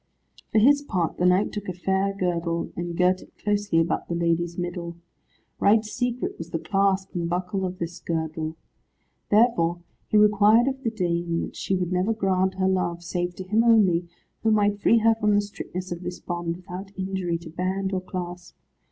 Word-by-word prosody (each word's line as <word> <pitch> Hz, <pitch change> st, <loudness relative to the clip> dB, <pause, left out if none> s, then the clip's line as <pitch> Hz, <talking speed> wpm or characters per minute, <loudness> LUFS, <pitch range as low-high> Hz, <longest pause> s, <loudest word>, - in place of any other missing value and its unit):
For -, -, +2 dB
his 285 Hz, +6 st, +6 dB
part 185 Hz, -, -2 dB
the 180 Hz, -, +3 dB
knight 185 Hz, +3 st, +3 dB
took 205 Hz, -2 st, -5 dB
a -, -, -2 dB
fair 190 Hz, +2 st, 0 dB
girdle, 170 Hz, -2 st, -1 dB
and 170 Hz, 0 st, -4 dB
girt 180 Hz, +1 st, +3 dB
it -, -, -18 dB
closely 205 Hz, -4 st, +1 dB
about 165 Hz, +1 st, 0 dB
the 170 Hz, -, -2 dB
lady's 170 Hz, 0 st, 0 dB
middle. 175 Hz, -1 st, -4 dB, 0.6 s
Right 215 Hz, +2 st, +4 dB
secret 245 Hz, +2 st, -3 dB
was 165 Hz, 0 st, -7 dB
the 165 Hz, -, -2 dB
clasp 195 Hz, +1 st, 0 dB
and 170 Hz, -1 st, -2 dB
buckle 180 Hz, +2 st, -1 dB
of 180 Hz, 0 st, -7 dB
this 170 Hz, 0 st, -5 dB
girdle. 160 Hz, -1 st, -3 dB, 0.7 s
Therefore 205 Hz, -6 st, +3 dB, 0.2 s
he 215 Hz, -, +2 dB
required 210 Hz, +3 st, +5 dB
of 265 Hz, 0 st, -2 dB
the 230 Hz, -, +1 dB
dame 170 Hz, -5 st, -1 dB
that -, -, -6 dB
she 190 Hz, -, -1 dB
would 180 Hz, -1 st, -2 dB
never 185 Hz, +5 st, +1 dB
grant 190 Hz, -3 st, +1 dB
her 190 Hz, 0 st, +1 dB
love, 175 Hz, -2 st, 0 dB
save 175 Hz, 0 st, -2 dB
to 185 Hz, -, -6 dB
him 215 Hz, +5 st, +2 dB
only, 195 Hz, -7 st, +4 dB, 0.3 s
who 225 Hz, -, +2 dB
might 205 Hz, -1 st, +2 dB
free 230 Hz, -, +5 dB
her 225 Hz, 0 st, +4 dB
from 210 Hz, -2 st, +1 dB
the -, -, +5 dB
strictness 185 Hz, -2 st, -7 dB
of 175 Hz, 0 st, -4 dB
this 180 Hz, 0 st, -5 dB
bond, 175 Hz, -1 st, -3 dB
without 185 Hz, +2 st, -8 dB
injury 190 Hz, -3 st, -2 dB
to 165 Hz, -1 st, -11 dB
band 190 Hz, +3 st, -2 dB
or 185 Hz, -, 0 dB
clasp. 180 Hz, -1 st, -7 dB
185 Hz, 190 wpm, -25 LUFS, 175-205 Hz, 0.7 s, his